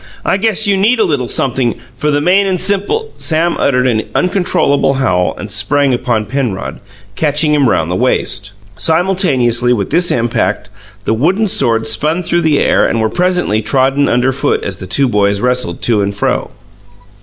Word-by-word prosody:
I - - +1
guess 220 +1 +1
you 200 -1 +2
need 225 +5 +2
a - - +4
little 135 -5 -1
sumpthing, 125 -2 0 0.2
for 150 +5 -2
the 145 0 +1
main 190 +5 +2
and 185 -2 -1
simple 205 - -1
" - - -28
Sam 165 +2 0
uttered 125 -2 +1
an 115 -4 +1
uncontrollable 175 -7 +1
howl 90 -10 0
and 105 - -8
sprang 130 +7 +1
upon 120 -3 -1
Penrod, 125 -6 -4 0.4
catching 150 +2 +1
him 140 -4 +2
round 80 +1 0
the - - -1
waist. 105 -3 0 0.3
Simultaneously 140 - +2
with 100 -5 -3
this 175 +3 +2
impact, 120 -1 -1 0.3
the - - +1
wooden 180 - +1
swords 115 - +1
spun 155 +10 0
through 175 0 0
the 155 -3 +2
air - - +2
and 115 - -1
were 110 0 0
presently 180 - 0
trodden 135 +5 +1
underfoot 130 +2 0
as 95 -2 -4
the 95 - -9
two 135 +8 +2
boys 100 -3 +1
wrestled 125 -7 -1
to 110 -4 +2
and 100 0 -2
fro. 100 - -1
135 Hz, 180 wpm, -13 LUFS, 115-175 Hz, 0.4 s, a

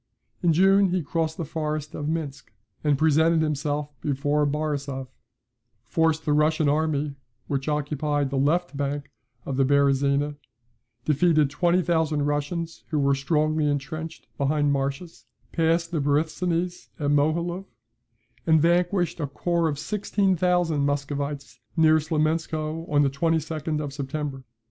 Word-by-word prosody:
In 175 - +3
June 195 +4 +5
he 180 -1 0
crossed 160 +1 -2
the 165 - -3
forest 155 -1 -3
of 150 0 -3
Minsk, 155 -4 -4 0.3
and 145 -2 +2
presented 160 +2 +3
himself 150 -1 -2
before 145 +1 +1
Borisov; 140 -3 -3 0.8
forced 160 +5 +1
the 150 - +2
Russian 155 +1 +2
army, 150 -1 +1 0.3
which 135 0 -3
occupied 145 -1 -1
the 140 - -1
left 160 +4 +1
bank 140 0 -3 0.3
of 135 - -3
the 135 - +4
Beresina; 140 +1 +2 0.7
defeated 155 -1 +3
20,000 165 -3 +1
Russians 145 +3 -2
who 155 - -1
were 140 -1 +3
strongly 155 +2 +1
entrenched 155 +3 -4
behind 145 +1 +2
marshes; 140 +5 -3 0.3
passed 165 +1 +1
the 160 -4 0
Borysthenes 165 +5 -1
at 145 -1 0
Mohiloev, 170 +5 +1 0.8
and 160 -1 +5
vanquished 175 +2 +2
a 145 - -1
corps 170 +4 0
of 145 - -3
16,000 180 -4 +1
Muscovites 140 -2 -3 0.2
near 160 -1 +5
Smolensko, 155 +1 -1
on 145 -1 +4
the 140 - +3
22d 155 0 -1
of 145 -2 -4
September. 140 -1 -4
150 Hz, 130 wpm, -25 LUFS, 145-165 Hz, 0.8 s, June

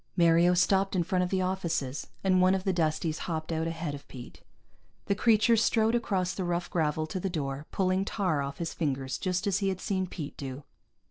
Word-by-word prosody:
Mario 170 +1 +5
stopped 195 +2 +2
in 175 - +2
front 180 +1 +1
of 180 - -2
the 185 0 +1
offices, 170 -7 -2 0.2
and 185 -1 +3
one 185 +1 +5
of 190 - -2
the 190 - +1
Dusties 160 -1 0
hopped 160 0 -3
out 160 0 -1
ahead 165 -2 -3
of 145 0 -9
Pete. 125 -2 -11 0.6
The - - +1
creature 220 +2 +4
strode 225 0 +3
across 190 -6 0
the 190 - -3
rough 175 0 -2
gravel 155 -2 0
to 175 +4 -4
the 195 - -2
door, 145 -3 -4
pulling 185 0 +1
tar 185 -8 0
off 140 0 -4
his 170 -1 -3
fingers 135 -4 -2
just 185 +1 -1
as 200 -1 +1
he 195 -1 +1
had 190 -1 -3
seen 190 -1 -1
Pete 150 -5 -7
do. 135 0 -6
180 Hz, 210 wpm, -29 LUFS, 155-190 Hz, 0.6 s, Mario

